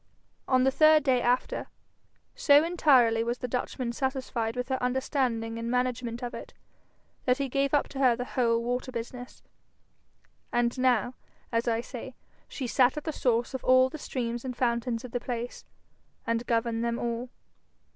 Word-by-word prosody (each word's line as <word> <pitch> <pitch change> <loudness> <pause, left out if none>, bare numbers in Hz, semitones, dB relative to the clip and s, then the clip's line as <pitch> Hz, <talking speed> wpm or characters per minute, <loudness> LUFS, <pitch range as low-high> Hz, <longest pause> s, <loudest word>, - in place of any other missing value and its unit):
On 255 -1 +3
the 265 - +3
third 310 +1 +5
day 260 -3 +2
after, 245 +1 0 0.7
so 295 -12 +5
entirely 260 -10 +4
was 240 +1 -2
the 250 - -4
Dutchman 250 0 -3
satisfied 260 -3 -2
with 250 +1 -3
her 260 -1 -1
understanding 250 -3 -1
and 230 0 -3
management 250 -1 -1
of 240 - -4
it, - - -9 0.7
that 250 0 +3
he 280 -1 -1
gave 275 +1 0
up 290 - +1
to 270 - -7
her 255 -3 +4
the 245 +1 -4
whole 235 -2 +1
water 250 +2 -2
business. 245 +1 -7 1.1
And 240 0 +1
now, 250 -1 +2 0.4
as 230 +1 0
I 230 0 +1
say, 250 +1 -8 0.3
she 265 - -5
sat 250 +3 +3
at 300 - -3
the 315 - -3
source 240 -2 0
of 260 - -4
all 255 0 +5
the 310 - -8
streams 240 -3 -3
and 250 -2 -5
fountains 235 -1 0
of 250 - -9
the 245 - -1
place, 240 -1 -5 0.6
and 230 0 -1
governed 230 0 0
them 235 0 -1
all. 240 +1 -3
250 Hz, 170 wpm, -28 LUFS, 235-260 Hz, 1.1 s, third